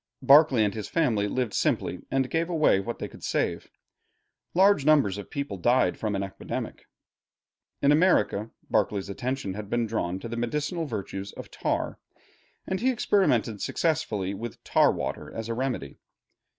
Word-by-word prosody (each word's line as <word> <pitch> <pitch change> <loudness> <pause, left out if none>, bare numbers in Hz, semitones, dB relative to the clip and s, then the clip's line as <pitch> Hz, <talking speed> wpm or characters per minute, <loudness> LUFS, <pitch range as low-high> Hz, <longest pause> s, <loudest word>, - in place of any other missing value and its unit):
Berkeley 140 -5 +6
and 100 - -1
his 105 -1 -6
family 120 -11 +1
lived 120 0 -2
simply - - 0
and 135 -1 +1
gave 165 +1 0
away 155 - +3
what 115 +4 -4
they - - -4
could - - -15
save. - - -1 0.9
Large 195 -3 +5
numbers 140 -10 +3
of 100 - -7
the - - -35
people 140 -8 -4
died 120 +8 +3
from 105 -2 -2
an 100 - -1
epidemic. 95 - -6 1.0
In 140 - +5
America 145 - +3 0.2
Berkeley's 100 -1 0
attention 125 0 -3
had 105 0 -7
been 120 0 +1
drawn 95 -5 -2
to 95 - -7
the 115 0 -5
medicinal 150 +8 -2
virtues 100 -4 -5
of - - -10
tar, - - -2 0.7
and 190 - -2
he 255 - +2
experimented 125 - +1
successfully 110 - -1
with 115 +3 -7
tar - - +4
water - - -4
as 115 0 -5
a - - 0
remedy. 120 - -3
120 Hz, 165 wpm, -27 LUFS, 100-150 Hz, 1.0 s, Berkeley